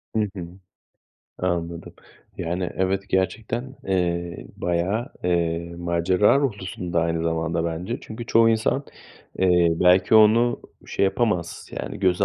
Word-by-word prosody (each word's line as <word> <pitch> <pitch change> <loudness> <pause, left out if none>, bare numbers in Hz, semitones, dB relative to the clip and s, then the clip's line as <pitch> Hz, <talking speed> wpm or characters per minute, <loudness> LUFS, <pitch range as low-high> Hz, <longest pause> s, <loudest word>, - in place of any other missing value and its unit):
Hı - - +2 0.2
hı. 90 -3 -5 0.9
Anladım. 85 -2 -3 0.4
Yani, 90 +1 -2
evet, 95 +1 0
gerçekten, 115 +8 -2
eee, 85 -6 -1
bayağı, 90 +8 -1 0.2
eee, 85 -1 0
macera 85 +6 +2
ruhlusun 95 -8 -3
da 85 - +3
aynı 85 0 0
zamanda 85 0 -1
bence. 85 +8 -3
Çünkü 115 +2 -8
çoğu 115 0 +5
insan, 115 +5 +1 0.5
eee, 90 -2 +4
belki 90 +5 +4
onu 115 +3 +5 0.3
şey - - 0
yapamaz, 95 -4 -1
yani, - - -6
göze 95 0 +2
90 Hz, 125 wpm, -24 LUFS, 85-105 Hz, 0.9 s, çoğu